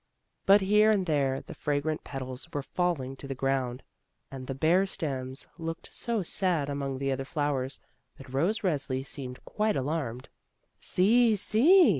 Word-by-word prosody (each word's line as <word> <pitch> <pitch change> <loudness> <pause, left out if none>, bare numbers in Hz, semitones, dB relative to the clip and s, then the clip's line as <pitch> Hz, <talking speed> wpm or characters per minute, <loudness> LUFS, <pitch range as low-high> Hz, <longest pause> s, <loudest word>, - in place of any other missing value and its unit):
But 200 +1 +7
here 210 +3 +5
and 200 -4 +3
there 140 -4 +1
the - - -10
fragrant 150 +1 -1
petals 130 -1 -6
were 145 - -3
falling 145 -6 -1
to 140 - -9
the 135 - -4
ground 130 -1 -1 0.5
and 130 -1 -7
the 135 - -3
bare 175 +7 +3
stems 135 -7 -4
looked 165 0 -5
so 230 -4 -1
sad 170 -5 +1
among 140 -1 -2
the 135 0 -1
other 135 0 -1
flowers, 140 -2 -1 0.4
that 135 -1 -12
Rose 175 +11 +1
Resli 140 -7 -1
seemed 130 -3 -6
quite 215 0 0
alarmed. 130 -3 -2 0.5
"See! 225 +4 +4
see!" 275 - +6
145 Hz, 155 wpm, -29 LUFS, 135-190 Hz, 0.5 s, But